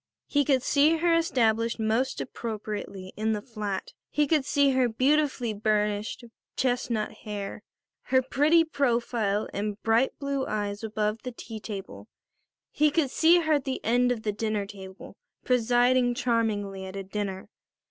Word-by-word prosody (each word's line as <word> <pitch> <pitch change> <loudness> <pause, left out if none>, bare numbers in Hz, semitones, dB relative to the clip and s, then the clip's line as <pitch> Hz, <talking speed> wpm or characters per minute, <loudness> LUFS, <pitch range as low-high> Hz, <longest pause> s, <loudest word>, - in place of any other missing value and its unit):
He 285 -1 +2
could 265 -2 +2
see 300 +4 +4
her 340 +1 +2
established 230 -9 +1
most 225 +4 0
appropriately 210 -5 -5
in 220 +1 0
the 210 - -3
flat. 210 -5 -5 0.2
He 295 - +2
could 295 -2 +2
see 285 0 +3
her 260 -2 +2
beautifully 260 -1 +1
burnished 210 +1 -1 0.3
chestnut 245 -4 0
hair, 205 -2 -6 0.4
her 260 0 +3
pretty 295 +6 +4
profile 235 -8 0
and 205 +1 -3
bright 230 +4 +2
blue 280 -1 -2
eyes 205 0 -3
above 215 0 -1
the 250 - -5
tea 225 -2 -8
table; 205 -2 -8 0.6
he 305 0 +3
could 295 -3 0
see 340 +2 +5
her 315 -1 +1
at 285 -3 +1
the 265 -1 -2
end 245 +2 +3
of 230 -3 -2
the 210 - 0
dinner 210 -1 -2
table 190 -2 -11 0.3
presiding 245 0 +3
charmingly 220 -6 -1
at 190 - -8
a 195 - -4
dinner. 195 -1 -4
230 Hz, 150 wpm, -27 LUFS, 210-265 Hz, 0.6 s, see